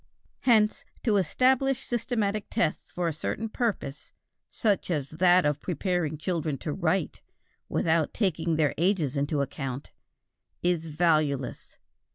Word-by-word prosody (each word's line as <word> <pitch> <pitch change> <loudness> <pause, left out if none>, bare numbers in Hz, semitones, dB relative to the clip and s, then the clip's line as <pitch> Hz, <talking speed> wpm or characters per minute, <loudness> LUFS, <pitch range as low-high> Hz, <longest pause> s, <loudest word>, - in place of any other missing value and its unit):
Hence, 220 -4 +3 0.2
to 215 -4 +3
establish 260 - +2
systematic 220 -3 -1
tests 220 -9 -1
for 175 -1 -1
a 165 - 0
certain 220 +8 -3
purpose, 215 - -3 0.4
such 205 -4 0
as 145 -5 -1
that 175 +2 +4
of 150 -1 0
preparing 175 -3 -1
children 155 -3 -2
to - - -4
write, - - -1 0.5
without 160 -1 +1
taking 170 -6 0
their 155 -2 +2
ages 170 -6 +1
into 145 +1 0
account, 135 -1 -4 0.7
is 175 -2 +1
valueless. 155 -4 0
170 Hz, 125 wpm, -27 LUFS, 150-210 Hz, 0.7 s, that